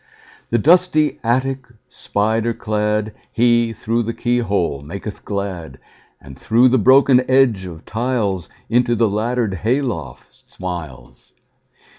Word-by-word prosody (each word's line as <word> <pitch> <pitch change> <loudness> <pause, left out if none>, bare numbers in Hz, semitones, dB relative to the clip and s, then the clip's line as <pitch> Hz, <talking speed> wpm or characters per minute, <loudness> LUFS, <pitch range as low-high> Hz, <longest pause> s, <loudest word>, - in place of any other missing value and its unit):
The 120 - +2
dusty 155 - +3
attic 130 +2 -1 0.2
spider 110 +2 -1
cladHe, 110 +2 0
through 115 +2 -1
the 115 0 -4
keyhole, 100 - -1
maketh 95 +7 -8
glad; 95 -8 -5 0.4
And 65 -1 -13
through 120 - +4
the 130 0 +3
broken 130 +2 +5
edge 130 -8 +3
of 80 -3 -11
tiles, 110 -6 -2 0.2
Into 120 0 +2
the 115 0 +2
laddered 110 +1 -1
hay 110 - 0
loft 85 - -7
smiles. 80 -9 -8
115 Hz, 115 wpm, -19 LUFS, 100-125 Hz, 0.4 s, broken